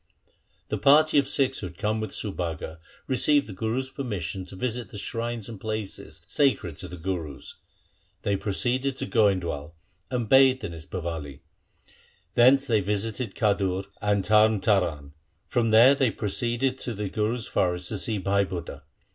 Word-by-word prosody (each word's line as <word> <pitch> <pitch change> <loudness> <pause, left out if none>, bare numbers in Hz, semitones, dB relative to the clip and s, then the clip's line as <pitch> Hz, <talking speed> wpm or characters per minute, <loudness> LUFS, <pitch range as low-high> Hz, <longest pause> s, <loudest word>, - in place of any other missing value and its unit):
The - - -2
party 150 +2 +5
of 140 - 0
Sikhs 135 -1 +1
who 95 - -4
had 85 -1 -13
come 105 +1 -1
with 110 - -3
Subhaga 85 -5 -4 0.3
received 140 +2 +3
the 105 - -8
Guru's 115 +7 -2
permission 100 - -4
to 95 - -10
visit 120 +3 -3
the - - -9
shrines 115 +1 -4
and 110 -4 -9
places 105 -7 -5
sacred 125 - +1
to 90 - -7
the 90 0 -9
Gurus. 80 -5 -5 0.7
They 100 -2 +1
proceeded 125 +7 -1
to 135 - -3
Goindwal, 90 - 0 0.3
and 125 -3 -2
bathed 130 0 +5
in 100 - -4
its 80 0 -10
Bawali. 80 -7 -5 0.9
Thence 130 +4 +5
they 115 -5 +2
visited 105 +2 -2
Khadur 100 -3 +1 0.2
and 105 -2 +1
Tarn 110 0 +5
Taran. 85 -9 +1 0.3
From 115 -2 0
there 115 +5 +7
they 135 -3 +2
proceeded 120 +5 -1
to 120 - -4
the 105 0 -3
Guru's 110 +4 -1
forest 90 -1 0
to 105 - -2
see 110 +1 -1
Bhai 100 +1 +1
Budha. 85 -6 -6
105 Hz, 160 wpm, -26 LUFS, 95-125 Hz, 0.9 s, there